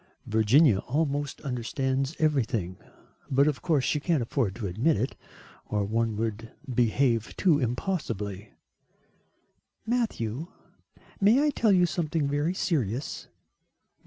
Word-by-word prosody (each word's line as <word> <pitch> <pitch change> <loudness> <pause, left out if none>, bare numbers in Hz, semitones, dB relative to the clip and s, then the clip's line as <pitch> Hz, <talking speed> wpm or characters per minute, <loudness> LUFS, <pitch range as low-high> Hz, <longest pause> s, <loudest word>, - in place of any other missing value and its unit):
"Virginia 110 +2 +4
almost 145 +2 -2
understands 130 +2 -2
everything, 115 - 0 0.5
but 135 +1 +4
of 150 -3 -1
course 155 -7 +1
she 150 - +1
can't 155 -4 +1
afford 115 -5 -1
to 115 - -5
admit 110 - +1
it, 125 +6 -2 0.5
or 105 -1 -1
one 115 +1 0
would 110 +1 -3 0.2
behave 120 -1 +1
too 165 -6 +3
impossibly." 115 - -3 1.3
"Matthew, 170 - -1 0.7
may 225 +8 +5
I 300 - +3
tell 230 -5 +2
you 180 -2 +5
something 160 -2 -1
very 145 +5 0
serious?" 135 - -2
135 Hz, 115 wpm, -27 LUFS, 115-155 Hz, 1.3 s, may